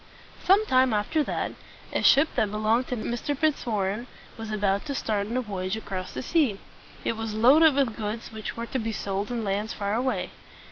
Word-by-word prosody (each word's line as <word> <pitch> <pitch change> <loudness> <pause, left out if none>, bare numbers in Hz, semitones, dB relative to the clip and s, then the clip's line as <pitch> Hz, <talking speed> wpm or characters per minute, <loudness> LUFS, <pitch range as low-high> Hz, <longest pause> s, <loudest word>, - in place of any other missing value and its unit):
Some 400 +4 +5
time 255 - +3
after 210 +10 +1
that, - - -2 0.4
a - - +1
ship 280 +3 +6
that 210 - +1
belonged 215 +4 +1
to 250 - -2
Mr. 240 +5 -3
Fitzwarren 235 -7 0 0.3
was 225 -1 -7
about 200 -2 +1
to 280 - -3
start 205 -5 -1
on 235 +3 -2
a - - +1
voyage 195 -3 -3
across 185 -4 -5
the - - -3
sea. 260 -9 +1 0.5
It - - 0
was 225 -1 -4
loaded 280 +7 +6
with 265 -6 +1
goods 220 +1 -4
which 220 0 -6
were 230 - -3
to 260 - -3
be 225 -1 -3
sold 200 0 -3
in 240 -2 -2
lands 205 +2 -1
far 200 0 -2
away. 255 +3 -1
225 Hz, 195 wpm, -26 LUFS, 205-255 Hz, 0.5 s, ship